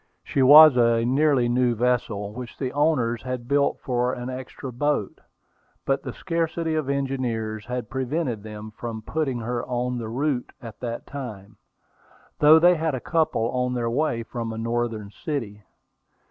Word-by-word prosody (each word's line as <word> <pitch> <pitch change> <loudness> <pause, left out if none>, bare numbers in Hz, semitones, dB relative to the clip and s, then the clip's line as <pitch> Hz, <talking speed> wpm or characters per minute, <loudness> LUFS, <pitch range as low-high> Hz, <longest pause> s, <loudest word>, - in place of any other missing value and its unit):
She 135 - -1
was 145 +1 +9
a 115 -1 +3
nearly 135 -1 +3
new 120 0 +2
vessel, 115 -4 -1
which 125 +1 -8
the 130 -2 -3
owners 145 -6 +1
had 125 -2 -5
built 140 +1 +2
for 125 0 0
an 125 +1 -5
extra 130 0 -7
boat, 145 -4 -1 0.6
but 135 0 +1
the - - -6
scarcity 165 -2 -2
of 155 -3 -1
engineers 120 -6 -2
had 125 -2 -4
prevented 130 -2 -2
them 105 0 -9
from 110 0 -6
putting 145 -2 -2
her 120 +1 -3
on 125 0 -2
the 110 -2 -5
route 130 +1 -2
at 115 -3 -10
that 120 -1 -5
time, 110 -7 -8 0.8
though 150 +2 +8
they 175 +2 +6
had 160 -2 -1
a - - -3
couple 155 -7 0
on 125 0 -1
their 115 -1 -1
way 120 -3 0
from 115 0 -5
a 110 - -6
northern 115 -2 -2
city. 110 - -5
125 Hz, 160 wpm, -24 LUFS, 115-140 Hz, 0.8 s, was